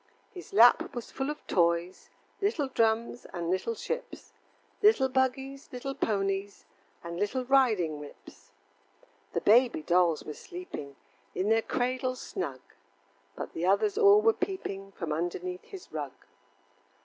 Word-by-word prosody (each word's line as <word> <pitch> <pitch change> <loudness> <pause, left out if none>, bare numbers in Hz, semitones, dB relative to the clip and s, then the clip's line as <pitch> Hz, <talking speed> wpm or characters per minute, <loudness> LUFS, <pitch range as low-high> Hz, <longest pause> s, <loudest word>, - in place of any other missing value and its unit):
His 360 -3 -10
lap 230 +5 +5
was 240 - -6
full 270 +1 -3
of 300 - -6
toys, 170 0 0 0.3
Little 390 -8 +1
drums 230 -1 0
and 170 0 -2
little 190 +5 -1
ships, 485 - -6 0.5
Little 415 -12 +5
buggies, 265 +1 -1
little 255 +2 -4
ponies, 200 -5 -2 0.4
And 170 0 -6
little 245 +6 -1
riding 220 - +3
whips. 145 -1 -13 0.8
The - - 0
baby 235 -5 +4
dolls 175 -2 +3
were 150 - -6
sleeping 355 - -8 0.4
In 195 +3 0
their 225 0 +4
cradles 255 +2 -1
snug, 140 -8 -5 0.7
But - - -6
the 170 +2 -2
others 390 - +3
all 415 -1 +6
were 450 0 +5
peeping 370 - -4
From 165 -4 -3
underneath 175 +3 -3
his 380 -2 -11
rug. - - -4
230 Hz, 135 wpm, -29 LUFS, 180-270 Hz, 0.8 s, all